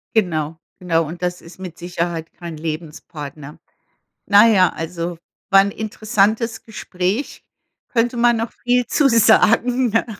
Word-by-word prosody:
Genau. 160 -6 0 0.2
Genau. 165 -2 +1
Und 170 +3 -8
das 180 0 -3
ist 170 +2 -15
mit 180 -3 -8
Sicherheit 170 -2 -4
kein 170 -3 -8
Lebenspartner. 155 -2 -7 0.7
Na 205 +2 +6
ja, 190 -5 +5
also 170 +1 -5 0.3
war 195 0 +8
'n 200 +1 -1
interessantes 215 +1 -1
Gespräch. 205 +2 -4 0.5
Könnte 240 0 0
man 240 0 +3
noch 225 +1 -3
viel 245 0 +2
zu 290 - +3
sagen, 230 +2 +4
ne? 225 - +1
185 Hz, 135 wpm, -20 LUFS, 165-225 Hz, 0.7 s, war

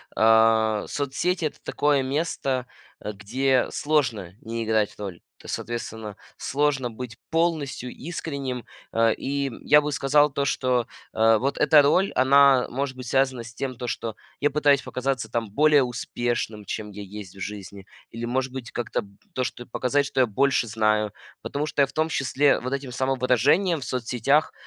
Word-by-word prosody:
а, 110 -1 +4
соцсети- 155 +5 -1
это 150 - -4
такое 145 -1 +1
место, 135 -3 -1 0.4
э, 105 - -4
где 125 +6 +1
сложно 125 - 0
не 115 0 -4
играть 110 -2 +1
роль. 95 -4 -7 0.2
То - - -13
соответственно, 110 -3 -5 0.2
сложно 140 -3 0
быть 115 0 -8
полностью 160 -6 0
искренним, 140 -6 -5 0.3
э, 115 0 +3
и, 140 0 -2
м, 125 - -8
я 150 0 +6
бы 150 - -3
сказал, 145 +1 +3
то, 140 0 -1
что, 125 -3 +1 0.3
э, 110 0 +4
вот 135 +5 -1
эта 150 0 +6
роль, 180 +7 +2
она 135 -1 +5
может 135 +1 -3
быть 130 -1 -8
связана 130 -1 +1
с 115 0 -11
тем, 130 +2 -4
то 125 +1 -6
что 115 -2 -3 0.2
я 145 - +2
пытаюсь 145 -1 +3
показаться 130 0 -2
там 115 -3 -2
более 150 +2 +5
успешным, 120 -2 -3
чем 105 +2 -5
я 105 +1 -8
есть 100 -1 -9
в 95 - -11
жизни. 100 0 -7 0.3
Или 115 +1 -7
может 130 +2 -1
быть 130 -3 -7
как-то 120 -2 -2
б 100 -1 -17 0.2
то, 130 - -1
что 120 -1 -5
показать, 135 +4 0
что 135 -1 0
я - - +5
больше 125 +3 +1
знаю, 110 -1 +1 0.3
потому 145 +2 -3
что 150 -2 0
я - - +6
в 135 - -13
том 155 +2 +1
числе 140 -1 +2
вот 125 - -4
этим 135 -2 -4
самовыражением 135 - +2
в - - -6
соцсетях 125 +4 +1
130 Hz, 175 wpm, -25 LUFS, 115-140 Hz, 0.4 s, я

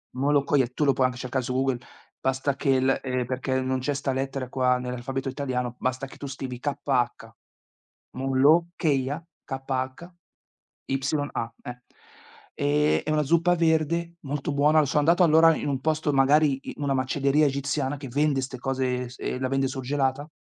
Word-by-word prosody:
Molokhia 140 -1 +2
tu 150 - 0
lo 135 - +4
po' 130 - +1
anche 125 -1 +1
cercare 130 0 -2
su 125 - -3
Google, 130 -1 0 0.4
basta 135 +1 0
che 135 -2 +2
l 130 +1 +2
ehm, 125 -1 -1
perché 130 +1 -1
non 130 0 -1
c'è 145 +3 -1
'sta 140 -1 -2
lettera 135 -1 -3
qua, 125 -1 +2
nell'alfabeto 125 +2 -4
italiano, 125 -3 -3
basta 130 +1 -2
che - - -14
tu 140 - -6
scrivi 130 -2 -6
"k-h". 130 -5 -1 0.9
Molokhia, 145 +2 +2 0.2
k-h-y-a, 135 +6 -6 1.2
eh. 125 0 -8 0.7
Ehm, 150 +1 +2
è 155 - -2
una 155 0 +2
zuppa 170 +4 +3
verde, 170 0 +1
molto 145 +1 -3
buona, 150 +2 +4
sono 150 +3 +2
andato, 170 +4 +4
allora, 165 0 +6
in 145 - -3
un 135 -2 -1
posto 155 +1 0
magari, 140 +1 +4
in 145 - -8
una 140 -1 +1
macelleria 140 +3 +2
egiziana, 140 0 -1
che 135 -1 -8
vende 145 +2 +1
'ste 130 0 -5
cose, 130 -1 -1
e - - -7
s 125 - -13
e - - -3
la 130 0 -1
vende 135 0 +1
surgelata, 135 +1 -1
135 Hz, 165 wpm, -26 LUFS, 130-145 Hz, 1.2 s, allora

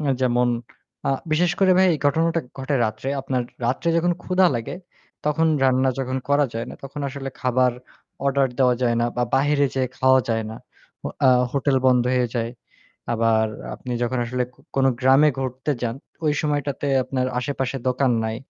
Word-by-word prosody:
আ - - -4 0.2
যেমন 125 -1 +2 0.6
আ - - +3 0.2
বিশেষ 175 +2 +3
করে 190 -1 +5
ভাই 190 - +6
এই - - -3
ঘটনাটা 165 +3 +2 0.2
ঘটে 135 +2 -2
রাত্রে। 110 +4 -3
আপনার 130 -1 -1 0.2
রাত্রে 130 +7 -1
যখন 175 +1 +2
ক্ষুধা 185 0 +3
লাগে 115 -1 -3 0.5
তখন 150 +2 +2 0.2
রান্না 130 0 +3
যখন 130 -1 -2
করা 145 0 +3
যায় 115 +1 -3
না, - - -8
তখন 140 +2 -7
আসলে 135 0 -6
খাবার 125 0 +2 0.5
অর্ডার 140 -1 +2
দেওয়া 125 -2 +4
যায় 120 -1 +2
না। 120 - +2
বা 125 - +1
বাইরে 145 +1 +3
যেয়ে 130 -1 0
খাওয়া 130 0 +5
যায় 110 -1 0
না। 110 - -7 0.5
অ - - -1 0.2
আ - - +6 0.2
হোটেল 140 -1 +1
বন্ধ 125 -1 +4
হয়ে 125 -1 +1
যায়। 115 -1 -1 0.6
আবার 115 -1 +2 0.3
আপনি 125 - -7
যখন 125 +1 -1
আসলে 125 +1 -1
ক - - -34 0.2
কোনো 135 0 +4
গ্রামে 135 +3 +5
ঘুরতে 130 +2 -2
যান 115 -1 -1 0.3
ওই 150 - +3
সময়টাতে 145 -2 -1 0.2
আপনার 130 -1 -1
আশেপাশে 135 +1 -2
দোকান 130 0 +2
নাই। 110 0 -2
130 Hz, 180 wpm, -23 LUFS, 125-145 Hz, 0.6 s, ভাই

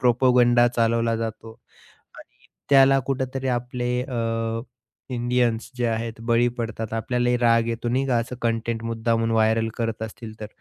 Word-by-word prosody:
Propaganda 120 -1 +4
चालवला 115 -1 +1
जातो. 115 0 -5 0.7
आणि - - -18 0.2
त्याला 135 0 +6
कुठेतरी 130 0 -2
आपले 125 0 -4
अ, 115 -3 -2 0.5
इंडियन्स 120 -1 0
जे 120 -1 0
आहेत 115 0 -3
बळी 120 +1 +4
पडतात 115 -1 -4
आपल्यालाही 120 +2 0
राग 115 -1 +3
येतो 115 +1 -3
नाही 130 +3 0
का, 125 -3 +1
असं 120 +2 -4
कंटेंट 115 0 -1
मुद्दामून 115 0 0
व्हायरल 110 0 +2
करत 115 -1 -2
असतील 110 0 -8
तर 105 - -5
115 Hz, 140 wpm, -24 LUFS, 115-125 Hz, 0.7 s, त्याला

